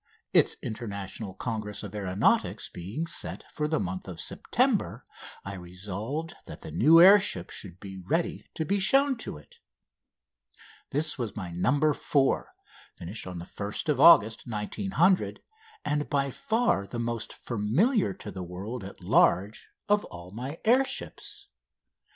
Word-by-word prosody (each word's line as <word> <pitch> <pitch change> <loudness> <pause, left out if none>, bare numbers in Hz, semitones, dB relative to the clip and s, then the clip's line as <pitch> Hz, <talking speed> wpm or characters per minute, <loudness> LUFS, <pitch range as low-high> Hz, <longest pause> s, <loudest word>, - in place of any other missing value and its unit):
Its - - +5
International 100 -3 -6
Congress 105 -1 -4
of 105 -1 -8
Aeronautics 95 -2 +1
being 100 - -5
set 170 - 0
for 150 - -2
the 155 0 0
month 90 0 -4
of 90 -3 -7
September 85 - 0 0.4
I 100 - -5
resolved 100 - -5
that - - -10
the - - -8
new 150 - +6
air 195 +4 +9
ship 90 - +1
should 95 -3 -5
be 95 -1 -9
ready 160 - -2
to 160 - -2
be 200 +5 0
shown 270 +8 +4
to 225 - -6
it. 75 - -18 1.3
This 150 0 +1
was 115 -4 -3
my 95 -4 -5
"No. 140 - +2
4," 135 -2 0 0.5
finished 95 +4 -7
1st 100 - -3
August 115 -9 +6
1900, 175 - 0 0.4
and 150 0 -1
by 140 -1 0
far 220 - 0
the 120 - -6
most 115 -1 -3
familiar 125 - +1
to 105 +2 -8
the 95 0 -7
world 95 +7 -6
at 95 - -10
large 100 +4 +2 0.2
of 205 0 +3
all 85 +1 -11
my 130 - -6
air 250 +4 +5
ships. - - -7
110 Hz, 140 wpm, -28 LUFS, 95-155 Hz, 1.3 s, air